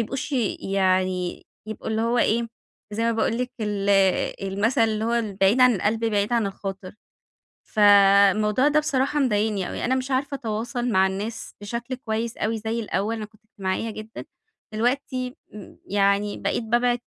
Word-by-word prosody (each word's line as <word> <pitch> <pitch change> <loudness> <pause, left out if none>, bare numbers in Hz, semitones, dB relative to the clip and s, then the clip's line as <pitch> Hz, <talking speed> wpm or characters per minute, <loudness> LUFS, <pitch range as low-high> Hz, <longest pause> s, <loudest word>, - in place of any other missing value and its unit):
يبقوش 270 +6 -4 0.3
يعني 185 -2 0 0.2
يبقوا 215 0 -6
اللي 220 0 0
هو 235 +1 +1
إيه، 230 +1 +1 0.4
زي 225 +2 -1
ما 230 - +2
باقول 225 +1 0
لِك، 250 0 -3
ال 205 -2 -2 0.6
المثل 225 +5 +1
اللي 220 -1 +1
هو 235 +1 0
البعيد 210 0 +1
عن 250 -2 +6
القلب 220 +4 0
بعيد 210 0 0
عن 230 -4 +2
الخاطر، 195 -1 -6 0.7
فالموضوع 205 +4 +5
ده 305 +1 +3
بصراحة 290 0 0
مضايقني 210 -5 0
أوي، - - -4
أنا 260 - +2
مش 260 +1 -3
عارفة 275 +2 -1
أتواصل 240 +1 -3
مع 190 -2 +4
الناس 205 +4 -5
بشكل 235 +4 -4
كويس 225 -1 -3
أوي 220 +1 -1
زي 225 +2 -3
الأول، 215 +1 -2
أنا 215 - -5
كنت 215 +1 -17
اجتماعية 195 +3 -2
جدًا، 215 +1 -8 0.5
دلوقتي 255 +2 -1 0.5
يعني 200 +1 +1
بقيت - - -1
بابعد 240 +2 +1
220 Hz, 155 wpm, -24 LUFS, 200-240 Hz, 0.7 s, عن